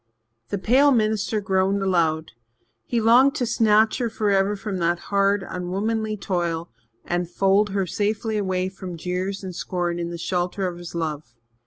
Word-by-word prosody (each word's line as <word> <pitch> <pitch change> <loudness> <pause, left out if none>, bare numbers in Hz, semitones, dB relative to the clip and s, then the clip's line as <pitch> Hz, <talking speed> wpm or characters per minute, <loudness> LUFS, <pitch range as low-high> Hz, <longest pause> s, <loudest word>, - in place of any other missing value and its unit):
The 200 - -1
pale 260 +9 +4
minister 215 -2 +1
groaned 195 0 +1
aloud. 160 -4 +1 0.6
He 235 - 0
longed 245 +6 +5
to 260 -5 0
snatch 220 0 +3
her 240 -2 0
forever 205 -2 +1
from 200 -1 -4
that 170 0 +1 0.2
hard, 200 0 +2
unwomanly 215 +4 -2
toil 170 - -2 0.3
and 175 0 -1
fold 195 +3 +2
her 195 -1 0
safely 215 +4 -1
away 185 -2 -1
from 185 -2 -7
jeers 185 +4 -3
and 185 -1 -5
scorn 175 -1 -2
in 170 0 -3
the 170 - -5
shelter 180 +2 -2
of 175 -1 -6
his 175 -1 -9
love. 155 -6 -4
195 Hz, 160 wpm, -23 LUFS, 175-215 Hz, 0.6 s, longed